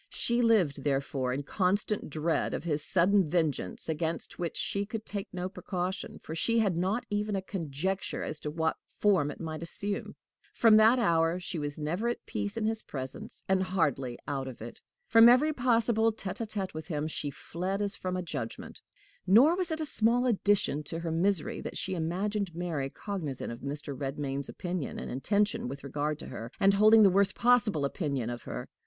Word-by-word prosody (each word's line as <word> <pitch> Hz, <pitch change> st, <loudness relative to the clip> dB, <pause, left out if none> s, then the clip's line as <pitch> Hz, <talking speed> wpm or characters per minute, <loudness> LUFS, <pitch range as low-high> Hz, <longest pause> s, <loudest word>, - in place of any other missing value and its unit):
She 235 Hz, +1 st, +1 dB
lived, 185 Hz, -, +3 dB
therefore, 135 Hz, -2 st, 0 dB
in 135 Hz, +3 st, -2 dB
constant 200 Hz, +5 st, 0 dB
dread 155 Hz, +2 st, 0 dB
of -, -, -5 dB
his 150 Hz, -3 st, -1 dB
sudden 185 Hz, 0 st, +3 dB
vengeance, 150 Hz, -, -1 dB
against 160 Hz, +1 st, -3 dB
which 170 Hz, -2 st, -3 dB
she 200 Hz, -, 0 dB
could 215 Hz, +1 st, -6 dB
take 200 Hz, -1 st, -5 dB
no 180 Hz, 0 st, -3 dB
precaution, 185 Hz, -1 st, -4 dB
for 160 Hz, -, -6 dB
she 230 Hz, +8 st, +1 dB
had 205 Hz, -6 st, +2 dB
not 190 Hz, +8 st, 0 dB
even 210 Hz, 0 st, 0 dB
a 195 Hz, -, -1 dB
conjecture 185 Hz, +1 st, -3 dB
as 155 Hz, -, -4 dB
to 150 Hz, -, -4 dB
what 160 Hz, +1 st, -1 dB, 0.2 s
form 190 Hz, -9 st, +3 dB
it -, -, -8 dB
might 160 Hz, -1 st, -5 dB
assume. 200 Hz, +4 st, -3 dB, 0.4 s
From 225 Hz, -2 st, +6 dB
that 220 Hz, +3 st, +6 dB
hour 165 Hz, -5 st, +2 dB
she 175 Hz, -2 st, -4 dB
was 145 Hz, -1 st, -4 dB
never 170 Hz, +9 st, -2 dB
at 240 Hz, -, -3 dB
peace 100 Hz, -1 st, -4 dB
in 215 Hz, -, 0 dB
his 220 Hz, 0 st, +1 dB
presence, 130 Hz, -2 st, -6 dB
and 190 Hz, 0 st, +3 dB
hardly 145 Hz, -10 st, 0 dB
out 135 Hz, -2 st, -2 dB
of 130 Hz, -, -8 dB
it; 115 Hz, +2 st, -9 dB, 0.3 s
from 230 Hz, +1 st, +8 dB
every 290 Hz, +6 st, +5 dB
possible 230 Hz, -3 st, +2 dB
tete 205 Hz, -1 st, -5 dB
a 225 Hz, -, -2 dB
tete 200 Hz, -3 st, -3 dB
with 155 Hz, 0 st, -7 dB
him 150 Hz, -2 st, -2 dB
she 150 Hz, -2 st, -2 dB
fled 180 Hz, +6 st, -4 dB
as 205 Hz, -1 st, 0 dB
from 185 Hz, 0 st, -3 dB
a 180 Hz, -, -2 dB
judgment. 135 Hz, -9 st, -6 dB, 0.5 s
Nor 250 Hz, -, +7 dB
was 365 Hz, -2 st, -1 dB
it 320 Hz, 0 st, -2 dB
a -, -, -1 dB
small 240 Hz, -2 st, +2 dB
addition 205 Hz, -, +2 dB
to 165 Hz, -, -4 dB
her 165 Hz, -1 st, -3 dB
misery 175 Hz, 0 st, 0 dB
that -, -, -5 dB
she 190 Hz, -, -2 dB
imagined 185 Hz, +2 st, -2 dB
Mary 165 Hz, -6 st, -2 dB
cognizant 160 Hz, -, -5 dB
of 115 Hz, -, -7 dB
Mr. 145 Hz, 0 st, -5 dB
Redmain's 135 Hz, 0 st, -3 dB
opinion 180 Hz, -5 st, -4 dB
and -, -, -5 dB
intention 200 Hz, -, 0 dB
with 140 Hz, +2 st, -7 dB
regard 145 Hz, +2 st, -2 dB
to -, -, -9 dB
her, 115 Hz, +2 st, -7 dB
and 195 Hz, 0 st, +5 dB
holding 215 Hz, +2 st, +7 dB
the 195 Hz, -, +7 dB
worst 195 Hz, +1 st, +3 dB
possible 215 Hz, -11 st, +3 dB
opinion 140 Hz, -, -2 dB
of 120 Hz, -, -6 dB
her. -, -, -6 dB
180 Hz, 195 wpm, -30 LUFS, 150-210 Hz, 0.5 s, from